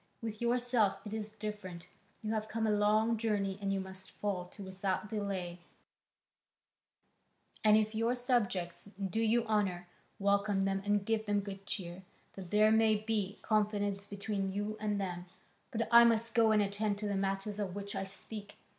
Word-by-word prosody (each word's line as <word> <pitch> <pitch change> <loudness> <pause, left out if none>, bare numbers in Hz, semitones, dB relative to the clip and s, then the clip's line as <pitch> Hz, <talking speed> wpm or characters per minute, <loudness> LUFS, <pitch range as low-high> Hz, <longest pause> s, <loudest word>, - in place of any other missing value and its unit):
With 220 -1 -5
yourself 240 -3 +2
it 210 - -5
is 215 -1 -3
different, 205 -5 -6 0.4
you 215 +1 -1
have 215 0 -1
come 225 0 -1
a 215 - +2
long 215 +2 +3
journey 205 -3 0
and 195 -1 0
you 195 - 0
must 190 0 -8
fall 195 -4 -3
to 195 +3 -11
without 190 +1 -2
delay, 195 -5 -3 2.0
and 215 0 +7
if 215 0 +1
your 230 +3 +1
subjects 200 -8 0
do 200 +3 -1
you 225 +1 +3
honour, 195 -5 0 0.3
welcome 200 0 +2
them 195 0 0
and 205 -1 +2
give 220 0 0
them 205 0 +2
good 195 0 -8
cheer, 175 -2 -4 0.3
that 185 -3 -8
there 215 +2 +5
may 220 0 +5
be 210 -2 -1
confidence 205 -2 0
between 200 -1 -2
you 205 +2 -2
and 210 -1 0
them, 180 -2 -4 0.4
but 230 0 -1
I 235 0 +10
must 230 0 +3
go 225 -1 +5
and 210 -1 +4
attend 205 +1 -1
to 210 0 -3
the 205 - -1
matters 195 +2 -1
of 195 -3 -2
which 200 0 -5
I - - -1
speak. 200 +2 -8
205 Hz, 170 wpm, -33 LUFS, 195-220 Hz, 2.0 s, I